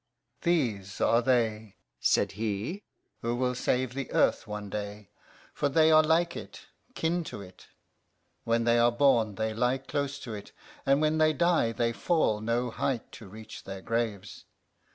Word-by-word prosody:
"These 115 - 0
are 115 +1 +3
they," 110 -4 0 0.2
said - - +2
he, 110 - -3 0.4
"who 120 +1 -1
will 125 0 0
save 125 0 0
the 135 0 -5
earth - - +2
one 105 -1 -5
day, 105 0 -6 0.4
for 145 - 0
they 160 +3 +4
are 155 0 +8
like 165 +2 +2
it, - - -9 0.3
kin 170 +2 0
to 105 - -7
it. 90 -1 -15 0.8
When 115 0 +1
they 120 0 +3
are 120 0 +5
born 120 -5 +3
they 110 +1 -2
lie 125 +3 +1
close 140 +1 -3
to 115 - -6
it, 100 -1 -9 0.3
and 140 +2 +4
when 155 +1 +2
they 155 0 +4
die 170 -7 +2
they 115 0 0
fall 115 -9 +1
no 120 +2 -1
height 125 0 -2
to 110 - -11
reach 110 +3 -11
their 95 -1 -7
graves. 105 -5 -3
120 Hz, 165 wpm, -29 LUFS, 110-140 Hz, 0.8 s, are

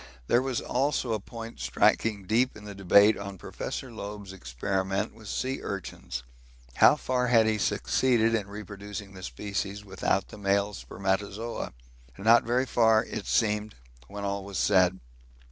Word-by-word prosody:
There 120 - +3
was 130 -2 -1
also 130 -2 0
a 110 - 0
point 115 +2 -9
striking 105 -1 +2
deep 120 +6 +2
in 105 - -12
the 105 - -7
debate 100 +2 +5
on 100 -1 -6
Professor 130 +8 -6
Loeb's 100 -3 -7
experiments 95 +6 -2
with 110 -1 -13
sea 130 +5 -2
urchins; 85 -9 -5 0.5
how - - +7
far 125 -1 0
had 115 -2 +5
he 110 -1 +1
succeeded 115 +1 +2
in 105 -3 0
reproducing 100 -1 -8
the 95 - -10
species 100 +1 -4
without 95 0 -1
the - - -11
male 100 +1 +1
spermatozoa? 100 +4 -3 0.4
Not 115 +4 +5
very 125 +3 +1
far, 110 -3 +4
it 110 - -6
seemed, 105 -1 +1 0.3
when 100 +5 -7
all 100 0 -2
was 100 -1 -6
said. 95 0 +3
105 Hz, 150 wpm, -28 LUFS, 100-115 Hz, 0.5 s, how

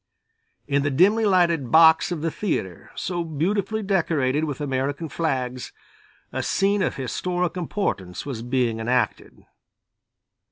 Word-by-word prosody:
In 140 -1 +1
the 145 - 0
dimly 200 +11 +3
lighted 170 - +2
box 160 +3 +6
of 170 -4 -3
the 165 - 0
theatre, 95 - -3
so 175 -2 -2
beautifully 195 +7 -1
decorated 160 -7 +1
with 145 -2 -5
American 140 +3 -2
flags, 130 -6 -3 0.6
a - - -1
scene 200 +1 +1
of 185 - 0
historic 175 +7 -2
importance 160 - -3
was 130 -6 -5
being 120 -2 0
enacted. 120 -1 -2
155 Hz, 125 wpm, -24 LUFS, 130-180 Hz, 0.6 s, box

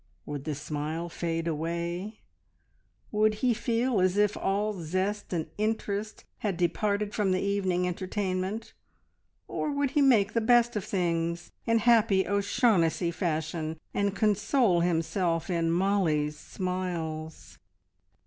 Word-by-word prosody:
Would 145 -2 -5
the 155 -2 -2
smile 155 +4 -4
fade 165 0 -2
away, 170 +6 -3 0.9
would 215 0 +3
he 245 - +4
feel 235 0 0
as 185 +1 +2
if 210 0 +3
all 205 +2 0
zest 185 +6 -2
and 165 -3 -1
interest 215 -1 -2 0.2
had 200 -5 -2
departed 205 +4 0
from 205 -3 +1
the 185 - +2
evening 190 -3 0
entertainment, 185 +3 -3 0.7
or - - -2
would 285 -2 0
he 295 - +2
make 225 -7 +4
the 230 - +2
best 240 +1 +4
of 210 - -1
things 170 -2 -1 0.2
in 230 0 +4
happy 220 -4 +4
O'Shaughnessy 200 -4 +2
fashion 160 -2 -2
and 200 -1 0
console 210 -1 +2
himself 170 +1 0
in 165 -1 +1
Mollie's 170 -5 +1
smiles? 165 -2 -5
185 Hz, 125 wpm, -28 LUFS, 165-210 Hz, 0.9 s, he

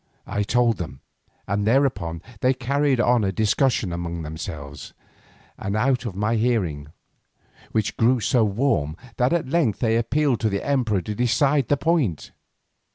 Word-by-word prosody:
I 105 - -2
told 115 +2 +2
them, 80 -6 -7 0.5
and 100 +2 -1
thereupon 110 -10 +1 0.2
they 130 +3 +2
carried 140 +1 +1
on 120 -1 +3
a 95 - +1
discussion 110 0 +1
among 85 -1 -4
themselves, 75 -2 -7 0.7
and 100 +1 -3
out 125 +2 +1
of 100 - -6
my 105 +3 0
hearing, 95 -12 0 0.8
which 110 -2 -1
grew 125 +2 +3
so 115 +1 +2
warm 100 - 0 0.2
that 125 +1 +2
at 170 -5 0
length 135 - +1
they 115 0 +1
appealed 130 +2 +1
to 110 - +1
the 100 -1 -3
emperor 120 -9 +1
to 105 - -4
decide 130 +4 +2
the 145 - +2
point. 145 - 0
115 Hz, 155 wpm, -23 LUFS, 95-130 Hz, 0.8 s, on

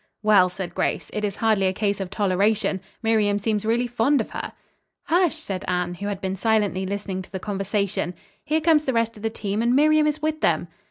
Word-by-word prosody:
"Well," 205 -4 +5
said 180 -1 -6
Grace, - - -2
"it 210 - -3
is 200 -2 -1
hardly 215 -4 +2
a 185 - 0
case 200 0 -1
of 190 -2 -4
toleration. 200 0 +1 0.2
Miriam 215 -2 +2
seems 210 0 -1
really 235 +2 +2
fond 245 +4 +2
of - - -3
her." - - -5 0.5
"Hush!" 345 -1 +2
said 195 - -5
Anne, 180 -1 -1
who 200 +3 -5
had 200 -2 -3
been 190 -1 -2
silently 205 -3 +1
listening 195 -1 -3
to 185 - -13
the 190 - -4
conversation. 200 -2 -2 0.3
"Here 315 +1 0
comes 310 -2 +4
the 265 - 0
rest 230 -1 0
of 210 - -12
the 225 - 0
team, 210 -1 -3
and 240 +2 +2
Miriam 305 +1 +4
is 300 0 -1
with 310 0 -2
them." 170 0 +1
210 Hz, 215 wpm, -24 LUFS, 190-235 Hz, 0.5 s, Well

